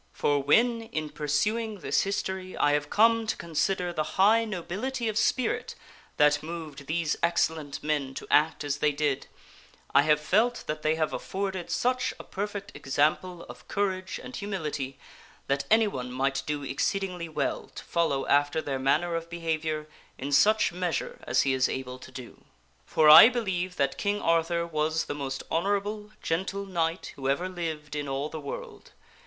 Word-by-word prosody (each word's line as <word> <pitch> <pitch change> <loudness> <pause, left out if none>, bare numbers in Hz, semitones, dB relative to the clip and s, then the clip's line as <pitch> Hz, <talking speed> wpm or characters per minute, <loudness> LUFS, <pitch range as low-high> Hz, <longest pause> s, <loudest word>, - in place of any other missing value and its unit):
For 145 -1 +1
when, 230 - +3
in 155 -10 -5
pursuing 205 +8 -1
this - - +2
history, 190 -1 -3
I 145 - +3
have 145 0 0
come 225 +1 +4
to - - -1
consider 175 +2 -1
the 155 - -1 0.2
high 220 +4 +5
nobility 220 +6 -3
of 215 - -1
spirit 250 +3 0 0.4
that 150 0 +4
moved 155 -4 -7
these 160 -1 0
excellent 160 -4 0
men 145 -3 -1
to - - -6
act 155 +1 +3
as 145 -1 -1
they 150 - +2
did, 145 -2 -1 0.7
I 140 - +7
have 150 0 +3
felt 220 +10 +1
that 150 0 -4
they 155 +1 +2
have 155 -1 -1
afforded 190 -2 -3
such 250 +7 0
a - - -7
perfect 205 0 -5
example 155 +6 0
oj - - -12
courage 190 -2 -2
and 255 - -8
humility 150 -9 -4 0.5
that 140 0 0
anyone 205 - +2
might 135 +2 0
do 150 -1 -2
exceedingly 180 +5 -2
well 155 -1 -2
to - - -7
follow 160 -5 0
after 145 +2 +2
their 140 -4 -3
manner 155 +6 +1
of 165 0 -3
behavior 160 -2 -2 0.3
in 140 +2 -5
such 205 +11 +4
measure 180 -3 -2
as 120 - +3
he 135 - +1
is 130 0 +2
able 130 -1 -5
to 130 - -12
do. 130 -2 -10 0.4
For 155 - +3
I 155 +9 +11
believe 190 -7 -2
that 140 -4 0
King 205 0 0
Arthur 165 0 +1
was 160 -1 -1
the - - -4
most 135 -2 -4
honorable, 205 +4 -1
gentle 190 +4 -2
Knight 170 -2 -2
who 135 -1 -2
ever 170 +7 0
lived 160 -5 -5
in 145 -1 -3
all 135 +2 -2
the 160 -1 -6
world. 140 - -8
165 Hz, 170 wpm, -28 LUFS, 145-195 Hz, 0.7 s, I